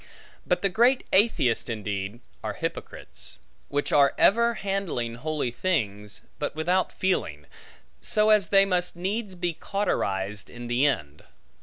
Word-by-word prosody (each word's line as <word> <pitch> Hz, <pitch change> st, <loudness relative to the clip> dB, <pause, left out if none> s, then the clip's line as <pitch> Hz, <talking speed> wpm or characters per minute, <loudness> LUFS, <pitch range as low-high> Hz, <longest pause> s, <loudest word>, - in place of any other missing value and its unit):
But -, -, +1 dB
the 195 Hz, -, +4 dB
great 240 Hz, +7 st, +3 dB
atheists, 190 Hz, -, +3 dB
indeed 105 Hz, 0 st, -4 dB, 0.2 s
are -, -, -2 dB
hypocrites; -, -, -6 dB, 0.3 s
which 145 Hz, 0 st, -1 dB
are 140 Hz, -2 st, +5 dB
ever 235 Hz, +3 st, +4 dB
handling 195 Hz, -, -2 dB
holy 145 Hz, 0 st, -2 dB
things, 105 Hz, -, -2 dB, 0.2 s
but 145 Hz, -, -3 dB
without 180 Hz, +4 st, +1 dB
feeling; 80 Hz, -, -1 dB, 0.6 s
so 215 Hz, 0 st, +3 dB
as 210 Hz, -5 st, +4 dB
they 195 Hz, +1 st, +5 dB
must 180 Hz, -2 st, 0 dB
needs 195 Hz, +3 st, -3 dB
be 175 Hz, -1 st, -2 dB
cauterized 100 Hz, -, -2 dB
in 120 Hz, 0 st, -9 dB
the 120 Hz, +4 st, +2 dB
end. 75 Hz, -, -2 dB
160 Hz, 135 wpm, -26 LUFS, 115-195 Hz, 0.6 s, are